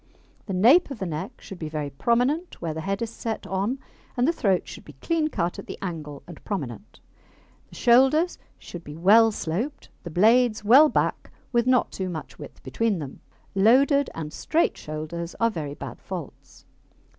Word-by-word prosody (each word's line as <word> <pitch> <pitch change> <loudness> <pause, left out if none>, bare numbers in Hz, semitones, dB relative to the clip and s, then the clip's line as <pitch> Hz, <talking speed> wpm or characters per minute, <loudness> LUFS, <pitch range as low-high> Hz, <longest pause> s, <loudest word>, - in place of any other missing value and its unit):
The 195 - -3
nape 250 - +5
of 275 - -6
the 195 - -4
neck 155 -3 -5
should 195 - -10
be 155 - -4
very 150 -2 -4
prominent 250 - 0
where 165 -2 -3
the 160 - -5
head 195 +6 -2
is 230 - -4
set 225 -1 -5
on, 200 +7 -1 0.4
and 245 +2 +3
the 335 - +3
throat 195 - +1
should - - -10
be - - -13
clean 330 -2 -1
cut 180 - -2
at - - -9
the - - -7
angle 155 -6 -6
and 170 -3 -12
prominent. 185 - -6 0.7
The - - -14
shoulders 270 +8 +4 0.2
should 175 -1 -10
be 150 0 -9
well 220 +6 +6
sloped, 210 - -4
the 175 - -7
blades 220 +5 +3
well 270 +9 +7
back, - - -1 0.2
with 240 0 +2
not 255 -1 +3
too 185 -1 -4
much 160 -3 -7
width - - -11
between 225 -4 0
them. 145 -5 -7 0.3
Loaded 265 +8 +4
and 155 -1 -6
straight 325 +2 +1
shoulders 155 +3 -6
are 230 0 +3
very 150 -6 -5
bad - - -8
faults. - - -9
200 Hz, 180 wpm, -25 LUFS, 165-250 Hz, 0.7 s, well